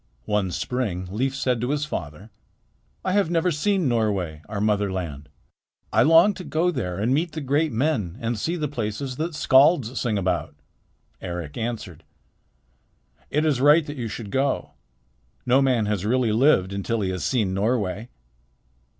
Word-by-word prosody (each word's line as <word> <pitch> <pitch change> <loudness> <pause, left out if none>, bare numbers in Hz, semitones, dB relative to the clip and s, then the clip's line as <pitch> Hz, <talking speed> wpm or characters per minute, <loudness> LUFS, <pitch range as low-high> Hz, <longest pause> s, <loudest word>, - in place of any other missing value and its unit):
One 105 -3 0
spring 95 -3 -3
Leif 130 +6 -1
said 130 -3 0
to 125 - -1
his 150 +1 0
father: 90 - -6 0.7
"I 185 - +1
have 200 -3 +2
never 170 +1 +1
seen 185 +2 +1
Norway, 100 -10 -1
our 105 -2 -3
mother 105 -1 +1
land. 75 -6 -5 0.6
I - - +5
long 165 +6 +6
to 185 - -8
go 170 +2 0
there 90 - -3
and 110 +6 +1
meet 160 +3 0
the 160 - -4
great 145 +3 +1
men 115 - -1
and 115 +1 -2
see 165 - -1
the 155 -3 -2
places 125 0 -4
that 160 +1 -3
skalds 135 -3 +4
sing 115 -4 0
about." 95 -5 -1 0.7
Eric 85 -5 -5
answered: 110 -8 -5 1.3
"It 150 +2 +1
is 140 -5 +1
right 150 +3 +6
that 145 - -6
you 120 -3 -3
should 105 -1 -7
go. 135 0 0 0.7
No 130 +2 +4
man 125 -5 +2
has 105 -3 -1
really 120 +1 +1
lived 110 -5 +3
until 105 +3 -2
he 95 -2 -1
has 90 -2 -4
seen 110 -8 0
Norway." 105 +1 -1
120 Hz, 165 wpm, -24 LUFS, 100-145 Hz, 1.3 s, long